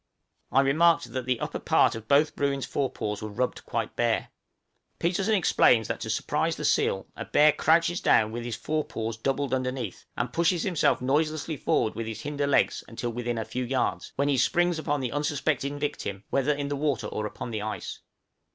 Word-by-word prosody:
I 135 - +5
remarked 165 +5 +3
that 130 -1 -3
the 125 -2 +1
upper - - -3
part - - +3
of 110 -1 -8
both 150 +3 +3
Bruin's 140 -1 0
fore 135 -2 -1
paws 105 -3 -4
were 110 - -5
rubbed 125 +5 -2
quite - - -3
bare; - - 0 0.7
Petersen 190 +5 +1
explains 120 - +4
that - - -3
to - - -5
surprise - - 0
the - - -4
seal - - +1
a - - -5
bear 150 +1 +5
crouches 165 +4 +2
down 110 0 +4
with 120 +1 -4
his 120 -2 -3
fore 155 +7 -1
paws 115 -3 -4
doubled 135 +3 -1
underneath, 130 -5 -3
and 125 0 -2
pushes 170 0 +2
himself 180 -9 +2
noiselessly 155 +3 0
forward 110 - +1
with 115 -1 -5
his 110 - -5
hinder 145 -1 -2
legs 140 - +2
until 120 +1 -4
within 120 0 -3
a 110 - -2
few 125 - -3
yards, 125 +1 -1
when 140 +1 +1
he 140 -2 +2
springs 175 +2 +2
upon 145 -2 -1
the 125 -2 -2
unsuspecting 145 -1 -1
victim, 125 -9 -4
whether 140 +2 +2
in 145 -1 -2
the 145 - -1
water 140 -5 -1
or 105 0 -3
upon 120 - -7
the 110 -2 -3
ice. 110 +1 -5
135 Hz, 195 wpm, -27 LUFS, 120-150 Hz, 0.7 s, I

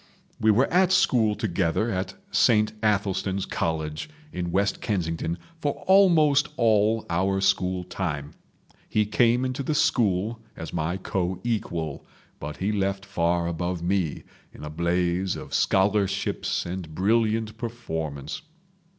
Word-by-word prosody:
We 110 -2 +3
were 115 +6 +5
at 185 0 +4
school 115 - +3
together 100 +1 0
at 95 -1 -3 0.2
Saint 110 -2 +3
Athelstan's 100 -2 0
College 80 - -3 0.2
in 90 -1 -3
West 100 +2 0
Kensington 85 -4 -2 0.2
for 145 -2 0
almost 165 -7 +5
all 110 -1 +3
our 95 +3 +1
school 95 -1 +1
time. 85 -5 -4 0.6
He 105 -1 +2
came 120 +4 +3
into 130 +1 -2
the 150 +3 -1
school 110 -4 +1 0.2
as 80 - -7
my 85 +2 -1
co 95 -1 -2
equal, 85 -10 -2 0.4
but 75 +1 -6
he 100 +3 -1
left 100 -1 -1
far 85 -3 0
above 85 +1 -2
me, 90 -4 0 0.3
in - - -12
a 75 - -6
blaze 85 +3 0
of - - -8
scholarships 100 0 +1
and 85 -3 -6
brilliant 110 +2 +1
performance. 80 - -4
95 Hz, 130 wpm, -25 LUFS, 85-110 Hz, 0.6 s, were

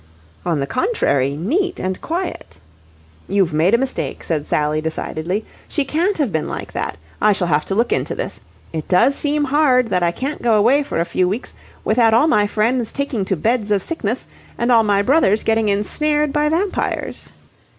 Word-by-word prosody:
"On 165 -4 +1
the 140 - 0
contrary, 140 - 0
neat 355 - -1
and 185 0 -3
quiet." 335 - -4 0.7
"You've 190 -4 +2
made 170 +8 +3
a - - +4
mistake," 265 +1 -3
said 155 -3 -2
Sally 150 +1 0
decidedly. 160 +5 -3 0.2
"She 290 - -1
can't 340 +9 0
have 285 -9 0
been 160 -2 -1
like - - -6
that. - - -3 0.2
I 210 0 +5
shall 185 - -1
have 150 -1 +2
to 195 - -2
look 235 +3 +2
into - - -2
this. - - -5 0.3
It 155 -2 -4
does 190 +9 +4
seem 295 0 0
hard 265 -4 +3
that 180 -2 +1
I 175 - +3
can't 270 - -4
go 235 -2 +3
away 240 +8 +4
for 280 - -3
a 170 - +1
few 180 +1 0
weeks 215 +7 -4 0.3
without 225 0 +4
all 235 - +5
my 210 -10 +3
friends 225 +3 0
taking 275 -8 -2
to 190 - 0
beds 220 +5 0
of 200 -3 +1
sickness 255 -8 -3 0.3
and 235 +1 +1
all 230 -2 +6
my 200 -2 +2
brothers 220 -5 +3
getting 220 -1 +2
ensnared 295 +8 0
by 300 0 +2
vampires." 365 +5 -2
225 Hz, 190 wpm, -19 LUFS, 185-285 Hz, 0.7 s, all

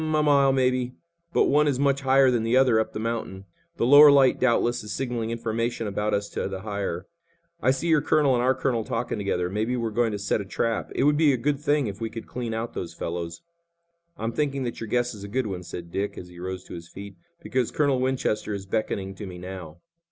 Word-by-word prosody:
"A - - -2
mile, 150 -3 +3
maybe, 130 -1 +1 0.4
but - - +3
one 150 +1 +3
is 140 -3 +1
much 140 0 +2
higher 135 -1 +5
than 120 -2 +1
the 115 +3 +2
other 125 -4 +4
up 110 - -1
the - - -5
mountain. 110 -4 -4 0.3
The - - +1
lower 145 +3 +9
light, 135 -2 +5
doubtless, 120 -2 +2
is 105 - -7
signaling 120 -3 -2
information 115 0 -2
about 105 +1 -1
us 100 0 -2
to - - -3
the 95 -1 -5
higher. 100 -4 -3 0.6
I - - +3
see 135 +6 0
your 160 -3 +4
colonel 145 -3 +3
and 120 - +2
our 130 +1 +3
colonel 120 -3 0
talking 110 - -3
together. 90 -3 -1
Maybe 110 +6 -1
we're 115 -2 -2
going 115 +1 +1
to 105 - -3
set 100 +1 -1
a - - -7
trap. 115 +3 -2
It - - +1
would 145 +1 +4
be 150 -3 +4
a - - 0
good 140 +3 0
thing 145 -1 +1
if 105 0 -6
we 115 - -2
could 115 0 -8
clean 120 -2 -5
out 115 +1 -4
those 85 -1 -6
fellows." 85 0 -5 0.7
"I'm 115 -3 -2
thinking 140 +1 -1
that 120 -2 -5
your 115 - -4
guess 120 +1 0
is 100 -2 -10
a - - -6
good 125 +4 -1
one," 95 -4 -4
said 85 -1 -8
Dick, 100 +3 -3
as 90 - -8
he 90 0 -13
rose 90 0 -5
to - - -11
his 85 -1 -8
feet, 100 0 -10 0.3
"because 125 +2 0
Colonel 140 -4 +1
Winchester 125 -5 -1
is 95 -1 -7
beckoning 95 -2 -2
to 100 +1 -8
me 90 -1 -8
now." 90 -3 -9
115 Hz, 240 wpm, -25 LUFS, 100-130 Hz, 0.7 s, lower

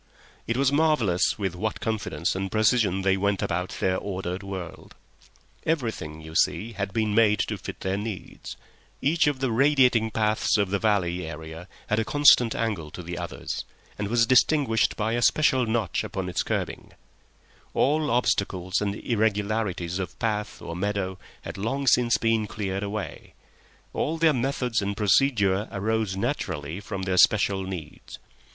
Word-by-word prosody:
It 115 - 0
was 135 0 +3
marvellous 140 - +2
with 95 -4 -2
what 105 +4 -3
confidence 105 -8 -2
and 95 0 -3
precision 110 -3 +2
they 95 0 +3
went 100 0 0
about 90 +2 -2
their 95 0 +1
ordered 95 -1 -4
world. 95 -3 -8 0.7
Everything, 110 - -2
you 80 0 -10
see, 110 +7 +1
had 100 -2 -4
been 110 0 0
made 105 -1 +4
to - - -2
fit - - -8
their 95 +1 -1
needs; 105 -2 -7 0.4
each 160 +3 +2
of 140 -3 0
the 130 -3 +1
radiating 125 -3 +4
paths 110 -1 +1
of 100 -2 0
the 100 - +1
valley 90 -5 0
area 80 +2 -8 0.2
had 105 - 0
a - - +2
constant 125 -3 +5
angle 105 -9 -2
to 90 - -9
the 85 +1 -5
others, 85 0 -5 0.4
and 105 - -1
was 115 +2 +3
distinguished 130 -2 +3
by 110 +1 -1
a 120 - 0
special 130 -2 +3
notch 110 -6 0
upon - - -4
its - - -1
kerbing; - - -4 0.8
all 150 +2 +2
obstacles 95 -6 0
and 100 -1 -1
irregularities 105 -5 -1
of 95 - -5
path 105 -2 -3
or 85 - -6
meadow 95 0 -2 0.2
had - - -7
long 135 +7 -2
since 120 -2 +4
been 115 -2 +1
cleared 100 -2 -3
away; 105 0 -6 0.6
all 160 +2 -1
their 160 -1 +4
methods 125 -3 0
and 100 +1 -3
procedure 105 -2 +2
arose 110 -1 -1
naturally 90 - -3
from 100 -2 -5
their 95 -1 -1
special 100 0 +4
needs. 90 -5 -8
105 Hz, 160 wpm, -26 LUFS, 95-115 Hz, 0.8 s, constant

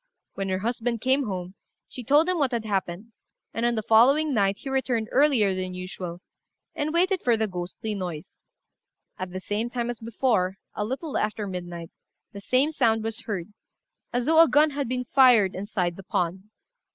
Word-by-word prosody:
When 195 -1 -3
her 185 - 0
husband 235 +3 -2
came 260 +2 +1
home, 185 -2 -5 0.3
she 250 - -8
told 290 +7 +4
him 365 -2 0
what 270 -3 +1
had 230 -2 -2
happened; 195 +1 -3 0.4
and 230 +1 0
on 240 - +1
the 220 - -2
following 270 +8 +4
night 200 -3 +2
he - - -11
returned 255 -4 -1
earlier 260 -8 +3
than 185 -1 -4
usual, 180 -1 -7 0.5
and 300 0 -2
waited 365 +3 +2
for 235 -2 +2
the 220 - +1
ghostly 185 +3 -5
noise. 180 -6 -7 0.8
At 185 0 -4
the 185 +1 -5
same 210 +5 -2
time 240 -1 -2
as 240 - -9
before, 225 -5 0 0.2
a 210 - -2
little 265 +7 -3
after 215 0 -2
midnight, 175 -3 -6 0.4
the 200 - -9
same 260 +8 +2
sound 225 -7 +2
was 225 +1 -4
heard 200 -2 -4 0.6
as 245 0 -1
though 320 +2 +6
a 330 - +7
gun 300 +1 +4
had 280 -3 -3
been 250 0 -2
fired 245 -7 +5
inside 185 -3 -2
the 195 - -9
pond. 180 +2 -2
225 Hz, 185 wpm, -26 LUFS, 190-260 Hz, 0.8 s, a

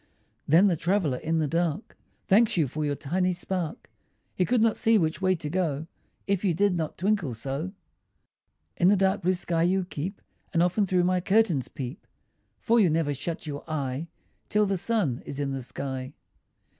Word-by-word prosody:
Then 165 +7 +6
the 190 -4 +3
traveller 165 -5 0
in 165 +1 -1
the 155 -2 +1
dark 170 - -1 0.3
Thanks 215 +1 +4
you 155 -4 +3
for 155 +5 -4
your 145 -1 0
tiny 180 +6 0
spark; 180 +2 -3 0.5
He 180 - +1
could 245 +3 +2
not 225 0 +3
see 225 0 +4
which 160 -1 0
way 185 0 +3
to 160 -3 -5
go, 160 -3 -1 0.4
If 200 -1 0
you 180 -5 +2
did 200 +1 +2
not 160 -3 -3
twinkle 185 - 0
so. 140 - -4 1.0
In 175 - +4
the 205 - +6
dark 195 +1 +2
blue 185 +2 +2
sky 170 -2 -1
you 185 +2 +2
keep, 180 +3 -5 0.3
And 170 -1 +4
often 185 +3 +1
through 180 -1 +2
my 180 0 +2
curtains 190 - +2
peep, 130 +4 -7 0.5
For 235 0 +3
you 195 -6 +5
never 155 -2 +1
shut 160 +5 -5
your 145 -2 -5
eye 140 0 -3 0.4
Till 210 0 +3
the 195 -1 0
sun 180 - 0
is 140 - -7
in 140 -1 -1
the 135 -1 -3
sky. 130 +1 -5
175 Hz, 185 wpm, -27 LUFS, 150-190 Hz, 1.0 s, Then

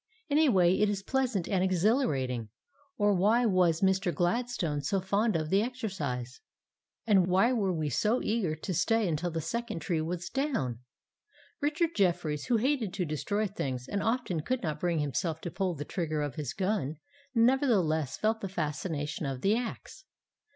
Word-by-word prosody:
In 290 +1 +3
a 315 -2 +5
way, 185 -4 +4
it 210 0 +3
is 200 -2 -2
pleasant 250 -7 0
and 190 -2 +1
exhilarating, 165 - +1 0.5
or 205 -1 +3
why 215 +6 +3
was 180 -5 +3
Mr. 190 -1 +2
Gladstone 175 -5 -1
so 190 +8 0
fond 200 +3 +1
of 155 -1 -1
the 195 +1 +4
exercise? 185 - -4 0.6
And 195 -5 +4
why 195 +7 +3
were 200 -6 +1
we 155 -4 -2
so 220 - +2
eager 210 -8 0
to 170 +4 -4
stay 215 +4 +2
until 170 +1 -1
the 165 -1 -3
second 230 +3 -3
tree 160 0 -1
was 175 +2 -3
down? 235 - -1 0.8
Richard 305 +3 +1
Jefferies, 170 -6 +1
who 240 - +3
hated 240 -5 0
to 185 -3 -1
destroy 200 +8 -1
things, 135 - -4
and 200 - -2
often 225 -8 0
could 255 +9 -2
not 155 -3 -2
bring 175 -1 0
himself 155 +2 -1
to 175 - -5
pull 185 -1 -1
the 145 0 -5
trigger 155 -4 -2
of 145 -3 -3
his 145 -1 -4
gun, 190 -7 -1 0.4
nevertheless 225 - +2
felt 220 +1 0
the 195 - -3
fascination 150 -3 -3
of 135 -2 -4
the 200 +6 +3
axe. 245 +10 -5
185 Hz, 170 wpm, -30 LUFS, 155-220 Hz, 0.8 s, a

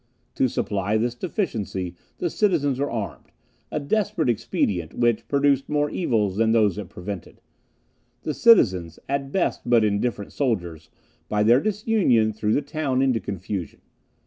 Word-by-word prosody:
To 130 - +2
supply 105 -2 -1
this 120 +2 0
deficiency, 110 - -3 0.2
the 175 - -2
citizens 145 -10 +1
were 145 - 0
armed 110 -4 -5 0.4
a - - -2
desperate 195 - 0
expedient, 100 -7 -1
which 120 -2 +1
produced 140 -1 +2
more 150 0 +1
evils 105 - 0
than 110 0 +3
those 105 -3 +3
it 105 - -7
prevented. 95 0 -7 0.8
The 155 - -2
citizens, 95 - +4
at 140 0 -2
best 190 - 0
but 120 -2 +5
indifferent 105 0 -1
soldiers, 85 - -2 0.4
by 105 0 +2
their 120 +4 +6
disunion 195 - +2
threw 105 0 -1
the 145 - +2
town 140 -3 -1
into 130 -4 +2
confusion. 95 -3 -5
120 Hz, 145 wpm, -24 LUFS, 105-145 Hz, 0.8 s, their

